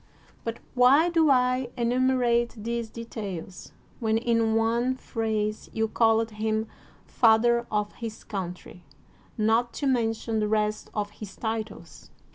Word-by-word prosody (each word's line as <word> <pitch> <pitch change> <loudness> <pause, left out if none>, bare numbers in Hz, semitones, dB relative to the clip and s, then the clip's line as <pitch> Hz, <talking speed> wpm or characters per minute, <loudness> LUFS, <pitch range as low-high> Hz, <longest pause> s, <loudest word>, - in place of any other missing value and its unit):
But 230 0 -3 0.2
why 270 +7 +5
do 325 -3 +3
I 255 -1 +2
enumerate 240 -1 +2
these 230 +1 -3
details, 205 -6 -7 0.3
when 220 -1 +1
in 230 -1 +1
one 235 +3 +1
phrase 220 -4 -2
you 220 0 0
called 225 0 +2
him 220 +1 -1 0.4
father 235 +1 +3
of 210 -1 -1
his 225 -2 -7
coun 185 -4 -4
try 180 - -14 0.3
— - - -31
not 225 +2 +2
to 285 - -3
mention 225 -3 0
the 210 - +1
rest 215 0 0
of 205 -1 -2
his 210 -2 -10
titles 220 -1 -5
225 Hz, 135 wpm, -26 LUFS, 215-240 Hz, 0.4 s, why